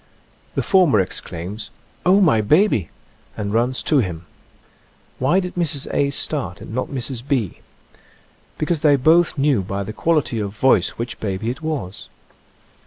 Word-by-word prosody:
The - - 0
former 180 - +4
exclaims, 95 +2 -4 0.2
" - - -34
Oh, 195 +3 +6
my 135 - +4
baby! 135 - +3 0.2
" - - -32
and 100 -1 -3
runs 120 +3 +1
to 150 - +3
him. 90 -7 -3 0.9
Why 140 +9 +3
did 180 -1 -4
Mrs. 155 -6 -1
A. 140 - +2
start 135 - -2
and - - -9
not 130 +2 -1
Mrs. 130 -2 -3
B.? 125 - -1 1.0
Because 155 0 -1
they 145 -2 +5
both 160 +5 +3
knew 140 -6 +2
by 100 +1 -3
the 110 - -6
quality 150 -5 0
of 105 0 -4
voice 110 -7 +3
which 115 +1 -5
baby 105 +2 -2
it 130 - -8
was. 145 - -4
130 Hz, 160 wpm, -21 LUFS, 105-155 Hz, 1.0 s, Oh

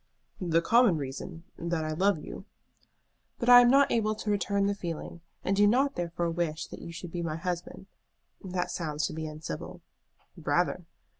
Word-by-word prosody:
"The 170 -2 +1
common 230 -4 +5
reason: 140 +3 -6 0.2
that 170 -2 -2
I 155 - -2
love 190 +4 +2
you." 150 - -9 0.9
"But 240 - -1
I 245 0 +11
am 240 - +5
not 275 +2 +5
able 215 -2 +1
to 210 0 -3
return 200 0 +1
the 200 - +1
feeling, 170 -3 -6 0.2
and 195 - +1
do 205 +1 +5
not 270 +6 +3
therefore 170 -1 -2
wish 165 -2 -2
that - - -9
you 170 - -8
should 175 0 -8
be 175 - -3
my 160 -2 -2
husband. 180 +2 -4 0.6
That 180 -2 -2
sounds 155 -2 -2
to - - -3
be 160 0 -4
uncivil." 155 - -7 0.5
"Rather." - - 0
175 Hz, 175 wpm, -29 LUFS, 165-205 Hz, 0.9 s, I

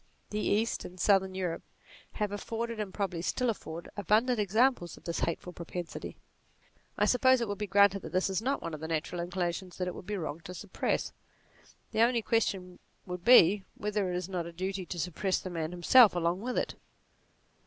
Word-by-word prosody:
The 210 - -1
East, 215 +2 0
and 180 +1 -10
Southern 190 -1 +3
Europe, 180 -3 -2 0.5
have 210 -2 -2
afforded, 225 +2 -4
and 205 -3 -3
probably 185 -4 -2
still 245 +7 0
afford, 170 -5 -7
abundant 215 +5 +2
examples 210 -2 +2
of - - -17
this 170 - -3
hateful 175 +2 -2
propensity. 175 0 -6 0.8
I - - +3
sup 250 - +2
pose 260 -1 +6
it 235 - -1
will 205 - -2
be 210 0 -4
granted 200 0 +4
that - - -8
this 185 +1 +1
is 190 0 -1
not 270 +4 -1
one 165 - -4
of 155 - -5
the 160 - -5
natural 165 +2 -2
inclinations 175 0 -3
which 180 - -1
it 180 - -3
would - - -10
be 210 -1 -2
wrong 155 -2 -4
to 180 - -7
suppress. 200 +1 -2 0.8
The 220 - +1
only 235 -1 +3
question 190 -6 0 0.3
would 180 -1 -6
be 205 -4 +7
whether 205 -2 -1
it - - -2
is 180 -1 -3
not 180 -3 -3
a - - -7
duty 185 +1 -4
to 180 - -5
suppress 180 +3 -1
the 185 - -7
man 160 -2 -2
himself 200 +5 +6
along 175 +2 0
with 250 +2 -3
it. - - 0
190 Hz, 200 wpm, -30 LUFS, 175-210 Hz, 0.8 s, be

